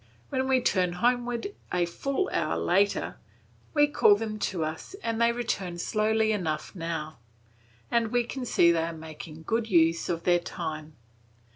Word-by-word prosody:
When 260 0 -1
we 260 -1 +3
turn 185 -6 +1
homewards 245 - 0 0.3
a 180 -1 +2
full 275 - -2
hour - - 0
later, 200 +3 +1 0.6
we 295 -1 +6
call 290 -8 +5
them 215 0 -4
to 170 -4 -2
us 160 - -6
and 230 0 -1
they 235 0 +5
return 200 -7 -3
slowly 220 +4 +1
enough 160 -7 -2
now, 165 -4 -4 0.7
and 235 -1 +2
we 245 +2 +1
can 255 +2 -5
see 170 -8 +4
they 165 -1 +2
are 165 +1 -2
making 160 0 -9
good 225 +4 -1
use 165 -3 +3
of 170 -1 -2
their 175 -1 +4
time. 155 -3 -6
190 Hz, 160 wpm, -28 LUFS, 165-235 Hz, 0.7 s, we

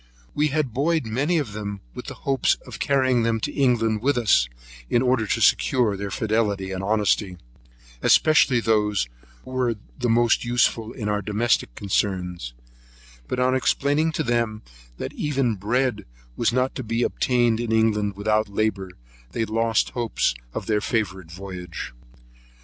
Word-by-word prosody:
We 150 +1 +2
had 145 -5 -1
buoyed 155 +3 +1
many 140 +10 0
of 140 -10 -2
them 105 -1 -4
up - - -20
with - - -7
the - - -7
hopes 135 -2 +2
of - - -9
carrying 130 -3 +2
them 115 0 +1
to - - -2
England 115 -5 +2
with 140 +1 +1
us, 105 - +3 0.4
in 120 - +2
order 125 -4 +2
to - - 0
secure 120 -6 +3
their 100 +1 -4
fidelity 105 -3 -1
and 95 0 -3
honesty, 105 -2 +1 0.6
especially 140 -6 +4
those 105 - +1 0.4
who - - -11
were 125 -3 0 0.3
most 120 -1 +3
useful 120 -2 +1
in 110 -4 -5
our 105 0 0
domestic 105 - 0
concerns; 90 - -2 0.7
but 125 - -2
on 130 0 +3
explaining 145 +4 +1
to 155 - -1
them 115 -3 -1 0.3
that - - -5
even 135 -5 0
bread 110 +2 -1 0.3
was 120 - +1
not 130 +2 +1
to 130 - -5
be 115 +2 -1
obtained 120 -3 +1
in 120 -1 -2
England 105 -3 +2
without 110 +1 +1
labour, 100 -2 -1 0.4
they 115 - 0
lost 115 +1 +1
hopes 120 - 0 0.2
of - - -5
their 105 -1 +1
favourite 95 -7 -2
voyage. 90 -8 -7
115 Hz, 155 wpm, -24 LUFS, 105-125 Hz, 0.7 s, especially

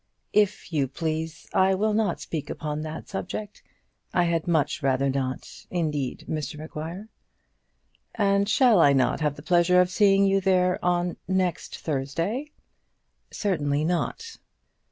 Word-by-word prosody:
"If 205 -4 +1
you 140 -3 +1
please, 160 +3 -4
I 190 0 +4
will 215 +2 +1
not 210 -4 0
speak 155 -4 -5
upon 150 -1 -4
that 155 0 -6
subject. 200 +2 -6 0.5
I 175 - +4
had 170 -1 0
much 165 0 +1
rather 135 0 +1
not, 130 -1 -4
indeed, 150 -7 -2
Mr 150 -1 -4
Maguire." 160 +6 -7 1.1
"And 200 -1 +2
shall 225 -1 +5
I 145 -4 +6
not 130 +3 +1
have 150 -2 0
the 145 - -11
pleasure 175 +1 +4
of 180 0 +3
seeing 195 -1 +4
you 195 0 +3
there 185 -1 +2
on 175 0 0
next 185 -2 -1
Thursday?" 165 - -2 0.8
"Certainly 150 -7 -1
not." 315 - -2
175 Hz, 135 wpm, -26 LUFS, 150-195 Hz, 1.1 s, I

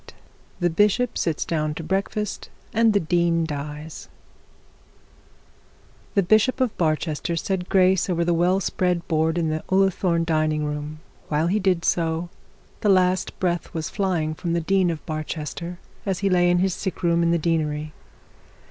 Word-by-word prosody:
CHAPTER - - -15
XXXVIII - - -30
THE 175 - +3
BISHOP 210 +7 +2
SITS 165 -3 -1
DOWN 155 -2 -1
TO 165 - -6
BREAKFAST, 195 +4 -2 0.2
AND 225 -1 +4
THE 205 - +4
DEAN 170 0 +1
DIES 150 +1 -6 2.1
The 200 - +4
bishop 215 +8 +3
of 255 -4 0
Barchester 155 0 -1
said 180 +2 -2
grace 190 0 +3
over 170 -1 +1
the 175 - +2
well 175 +3 +2
spread 180 -2 -1
board 160 +1 +1
in 165 -2 +1
the 155 0 -2
Ullathorne 190 -3 +2
dining 155 -2 +1
room; 150 0 -3
and 155 +1 -14
while 150 +1 +1
he 195 +5 +1
did 185 -4 +1
so 165 0 0 0.5
the 210 - +1
last 185 -1 +2
breath 175 -2 -1
was 160 -1 -3
flying 175 -6 0
from 170 +1 -3
the 170 - +1
dean 190 +1 +2
of 165 -2 -4
Barchester 155 +2 -5 0.3
as 195 -3 -1
he 195 - +2
lay 175 -1 +4
in 175 - +3
his 185 +1 +1
sick 190 0 -5
room 170 0 +3
in 170 - +2
the 170 - +3
deanery. 155 -2 -1
170 Hz, 170 wpm, -23 LUFS, 155-185 Hz, 2.1 s, AND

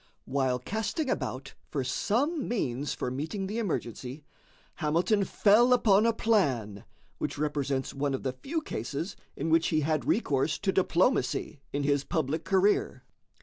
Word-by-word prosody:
While 130 -2 +1
casting 220 - -2
about 130 +1 -3 0.2
for 140 -3 -2
some 265 - 0
means 145 - -1
for 125 - -3
meeting 160 - -3
the 210 +4 -3
emergency, 135 - -4 0.5
Hamilton 175 +6 +2
fell 230 +7 +5
upon 215 -3 +4
a - - +5
plan 130 - 0 0.3
which - - -3
represents 140 -2 -1
one 140 0 -1
of - - -6
the 130 - -1
few 305 - -4
cases 145 - -4 0.2
in 160 +3 -2
which 165 0 +4
he 155 -1 +1
had 155 0 0
recourse 150 - +1
to 200 - 0
diplomacy 185 - +1
in 145 0 -1
his 140 0 +2
public 160 +1 -1
career. 195 +2 +2
155 Hz, 145 wpm, -29 LUFS, 135-210 Hz, 0.5 s, fell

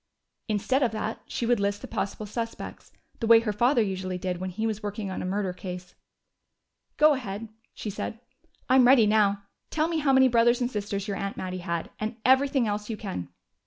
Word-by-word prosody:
Instead 225 +5 +1
of 250 - +3
that, 220 0 -3
she 235 - -3
would 240 -1 +2
list 200 0 -1
the - - -5
possible 200 +2 -3
suspects, 230 +2 -6 0.3
the 230 - -1
way 230 0 +8
her 215 -2 -1
father 240 +3 +3
usually 185 -2 -3
did 180 -1 -3
when 185 0 -3
he 215 +5 -3
was 215 -1 -2
working 205 -1 -4
on - - -4
a - - -4
murder 190 -1 -1
case. 180 0 -8 1.0
"Go 305 0 +6
ahead," 225 -4 -5 0.3
she 210 - -5
said. 215 +2 -5 0.5
"I'm 255 -1 +6
ready 250 -4 +7
now. 205 -1 +3 0.3
Tell 310 0 +1
me 330 -1 -1
how 290 -2 +2
many 265 0 +6
brothers 235 0 +4
and 245 0 -1
sisters 200 -1 -3
your 200 -1 -2
aunt 200 0 -4
Mattie 185 0 -4
had, 170 -2 -3
and 215 +2 -3
everything 265 0 +4
else 210 +1 -3
you 220 - -3
can." 190 - -5
215 Hz, 200 wpm, -27 LUFS, 195-240 Hz, 1.0 s, way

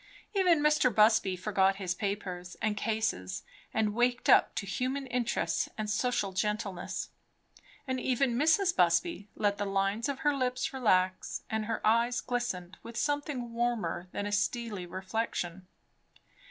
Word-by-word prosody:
Even 360 -6 +4
Mr. 300 -3 +4
Busby 215 -3 +4
forgot 195 +1 +2
his 190 -3 -2
papers 185 -3 -4
and 215 -1 0
cases 210 - -2 0.3
and 215 -1 +1
waked 245 +2 +1
up - - +6
to 200 - -2
human 255 +8 -2
interests 245 -2 -1
and 215 -1 -2
social 215 -3 0
gentleness; 200 -2 -2 0.7
and 260 -2 -2
even 255 0 +1
Mrs. 320 +7 +3
Busby 200 - +2
let 205 -1 0
the 205 - 0
lines 195 +5 0
of 275 - -3
her 295 -1 +3
lips 255 +3 -1
relax, 185 -7 +1
and 220 -1 -1
her 225 0 -3
eyes 235 +2 +3
glistened 220 -7 -3
with 230 0 -9
something 290 -5 -2
warmer 235 -6 -1
than 205 - -3
a 205 - -3
steely 210 -2 -1
reflection. 185 -2 -3
220 Hz, 140 wpm, -30 LUFS, 195-250 Hz, 0.7 s, up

